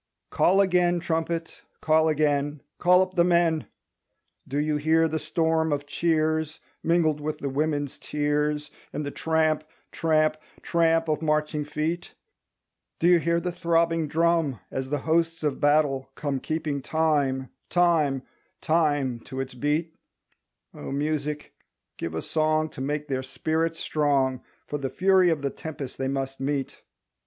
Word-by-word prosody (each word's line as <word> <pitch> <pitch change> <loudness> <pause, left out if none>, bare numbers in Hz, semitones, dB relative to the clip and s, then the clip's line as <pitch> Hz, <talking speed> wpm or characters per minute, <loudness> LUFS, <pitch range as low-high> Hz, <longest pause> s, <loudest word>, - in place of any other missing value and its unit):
Call 195 +2 +4
again, 180 -2 +3
trumpet, 165 0 -2 0.2
call 160 0 +3
again, 145 -1 0 0.2
Call 180 +1 +5
up 185 0 -7
the 175 -2 +4
men! 170 -3 +2 0.8
Do 140 - -3
you 150 0 +1
hear 160 +2 +3
the 160 0 -2
storm 160 +1 +1
of 145 0 -1
cheers 155 0 0 0.2
Mingled 160 -3 +2
with 155 +1 -3
the 140 - -3
women's 145 -1 -1
tears 150 0 -1 0.2
And 150 - -4
the 145 - -4
tramp, 160 -1 +1 0.3
tramp, 155 -1 +2 0.3
tramp 165 -1 +2
of 155 0 0
marching 150 -1 0
feet? 155 +4 -3 0.8
Do 170 - +2
you 175 -1 +6
hear 170 +1 +1
the 180 +1 -3
throbbing 165 -2 +1
drum 165 - +1
As 130 0 -3
the 145 - 0
hosts 165 0 +1
of 145 -3 -1
battle 145 -2 +2
come 140 -3 -2
Keeping 150 0 -2
time, 140 -4 0 0.2
time, 160 -7 +2 0.4
time 145 -6 +1
to 130 +3 -8
its 135 -1 -4
beat? 150 +5 -1 0.8
O - - -7
Music 150 +1 -2 0.4
give 80 -1 -4
a 80 - -3
song 155 0 +1
To 130 - -9
make 150 +2 -2
their 130 -2 -1
spirit 160 +5 -1
strong 140 -5 +1 0.2
For 145 - -4
the 135 -1 -2
fury 185 +1 +4
of 155 -4 0
the 140 - 0
tempest 145 -5 -7
they 135 - -1
must 135 0 -3
meet. 135 0 -3
155 Hz, 145 wpm, -26 LUFS, 145-165 Hz, 0.8 s, you